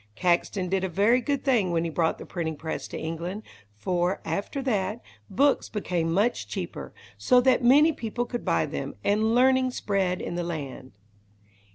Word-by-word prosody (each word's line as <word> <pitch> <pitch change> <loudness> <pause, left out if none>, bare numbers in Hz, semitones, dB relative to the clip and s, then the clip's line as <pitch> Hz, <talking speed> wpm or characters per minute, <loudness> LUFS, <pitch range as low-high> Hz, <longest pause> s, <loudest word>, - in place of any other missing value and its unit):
Caxton 180 +1 +1
did 190 +1 0
a 190 - -1
very 210 +8 +3
good 280 +2 -1
thing 235 -9 +2
when 170 -1 0
he 170 - -2
brought 160 +1 0
the - - -9
printing 160 -3 -3
press 160 +2 -5
to - - -7
England, 170 +6 -5 0.3
for, 175 - 0
after 200 - -3
that, 210 -3 -1 0.3
books 275 +8 +2
became 175 -6 -2
much 205 +8 +1
cheaper, - - -6 0.3
so 250 -1 +5
that 255 0 +3
many 290 +6 +6
people 240 -1 -3
could 240 0 -5
buy - - +1
them, - - -5
and 215 +3 +2
learning 260 +1 +4
spread 195 -6 -1
in - - -5
the 175 0 -2
land. 140 - -6
195 Hz, 175 wpm, -26 LUFS, 170-245 Hz, 0.3 s, many